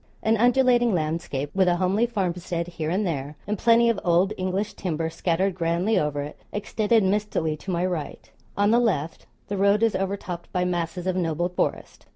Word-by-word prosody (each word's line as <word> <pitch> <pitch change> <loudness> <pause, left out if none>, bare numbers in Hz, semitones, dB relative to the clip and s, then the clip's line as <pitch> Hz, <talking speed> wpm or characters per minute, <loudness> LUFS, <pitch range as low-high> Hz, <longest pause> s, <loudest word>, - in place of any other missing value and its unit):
An 220 +1 +3
undulating 245 -1 +3
landscape, 155 -3 -2
with 190 -1 +3
a 175 - +3
homely 190 +6 +1
farmstead 180 -5 -2
here 165 -3 -4
and 195 +5 0
there, 145 -3 -3
and 210 - -1
plenty 230 +3 +4
of 230 -4 +1
old 175 +3 +3
English 185 +3 -2
timber 165 -3 -3
scattered 180 +3 0
grandly 175 +5 +1
over 145 -1 -1
it, 145 - -9
extended 210 +1 +1
mistily 190 -5 0
to 195 - -10
my 175 0 0
right; 175 -5 -5 0.3
on 205 +1 +3
the 235 - +5
left 170 -10 -1 0.2
the 200 - -3
road 200 +3 +3
is 225 -2 +2
overtopped 190 -2 -4
by 180 0 0
masses 175 0 -2
of 185 -1 0
noble 175 -1 0
forest. 180 - -3
185 Hz, 185 wpm, -25 LUFS, 170-210 Hz, 0.3 s, the